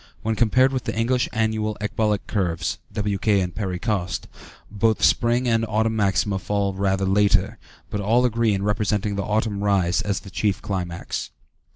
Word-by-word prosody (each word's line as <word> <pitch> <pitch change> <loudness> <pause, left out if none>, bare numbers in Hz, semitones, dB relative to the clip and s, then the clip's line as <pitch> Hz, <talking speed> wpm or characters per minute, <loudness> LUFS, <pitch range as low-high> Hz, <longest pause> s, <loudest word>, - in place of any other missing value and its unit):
When 110 - 0
compared 130 +4 +3
with 130 -3 -2
the - - -2
English 125 +2 +1
annual 110 -1 -1
ecbolic 105 0 -1
curves 85 -5 -1
(W.K. 105 -1 +1
and 90 -2 -2
Perry 95 -3 -3
Coste), 100 -3 -2 0.4
both 110 +1 +1
spring 120 +2 +3
and 115 -1 +2
autumn 110 +1 +1
maxima 100 -1 +1
fall 100 0 -1
rather 95 0 0
later, 100 +1 +2 0.3
but 105 - -2
all 115 +5 +3
agree 115 -3 +2
in 95 - -3
representing 105 0 0
the 100 - -1
autumn 105 0 -1
rise 95 -4 +2
as 100 -2 -2
the 95 - -12
chief 100 +1 0
climax. 90 -4 -4
105 Hz, 165 wpm, -23 LUFS, 100-110 Hz, 0.4 s, compared